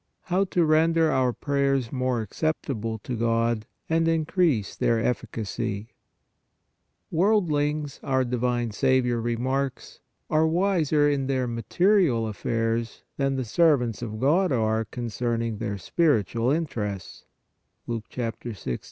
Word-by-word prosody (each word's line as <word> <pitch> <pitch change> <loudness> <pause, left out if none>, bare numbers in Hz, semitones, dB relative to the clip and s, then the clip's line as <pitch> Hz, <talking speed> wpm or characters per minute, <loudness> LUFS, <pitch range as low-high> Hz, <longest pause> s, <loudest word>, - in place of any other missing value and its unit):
HOW 190 +2 +1
TO 175 -2 +1
RENDER 160 +1 +3
OUR 130 -2 +2
PRAYERS 135 -2 0
MORE 125 -3 0
ACCEPTABLE 115 - -2
TO 125 - -3
GOD 115 -1 0 0.2
AND 165 0 +2
INCREASE 165 - +1
THEIR 115 - +2
EFFICACY 110 -2 -3 1.2
Worldlings, 155 -6 +1
our 130 -1 +1
divine 120 -1 -1
Saviour 125 +1 +2
remarks, 130 +3 -2 0.3
are 155 +1 +3
wiser 160 -4 +2
in 140 -2 0
their 130 -2 0
material 125 - +2
affairs 115 +2 -2
than 135 -1 +1
the 130 -1 -2
servants 125 -4 +2
of 110 -2 -5
God 165 - +3
are 110 -2 +1
concerning 115 -1 -3
their 105 -3 -3
spiritual 115 - +1
interests 110 - -3 0.6
(Luke 115 -2 -4
1 120 -2 -2 0.2
6. 65 -10 -4
125 Hz, 115 wpm, -26 LUFS, 115-155 Hz, 1.2 s, RENDER